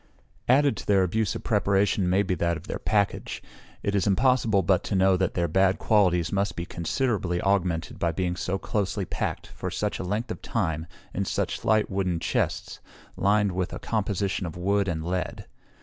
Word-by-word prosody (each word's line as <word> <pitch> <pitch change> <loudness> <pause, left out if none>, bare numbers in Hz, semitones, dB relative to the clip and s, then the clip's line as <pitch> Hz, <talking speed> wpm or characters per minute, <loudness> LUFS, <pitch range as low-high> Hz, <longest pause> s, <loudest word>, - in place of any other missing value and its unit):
Added 135 -3 +4
to - - -8
their 100 -2 +4
abuse 110 +4 0
of - - -6
preparation 100 -3 +2
may 95 +3 +3
be 95 - -1
that 85 -1 0
of 80 - -12
their - - -4
package. 100 -2 -1 0.4
It 100 - 0
is 100 -2 +1
impossible 110 -1 +3
but 95 0 +2
to 100 - -1
know 95 0 +4
that 90 -1 0
their 85 -1 +1
bad 95 +1 +3
qualities 90 -6 +2
must 100 +1 0
be 85 - -4
considerably 90 0 -1
augmented 90 -4 0
by 85 - +1
being 90 0 -1
so 90 +1 -2
closely 100 -1 -2
packed, - - -3
for - - -6
such - - -2
a - - -3
length 105 +6 -2
of - - -6
time, 80 -7 -2 0.3
in - - -1
such - - -1
slight 110 -1 +2
wooden 95 -3 0
chests, - - -1 0.4
lined 100 0 +2
with 90 0 -2
a - - -4
composition 100 -3 -1
of 80 - -7
wood 100 +2 +1
and 80 -3 -2
lead. 90 +1 -3
95 Hz, 190 wpm, -26 LUFS, 90-105 Hz, 0.4 s, Added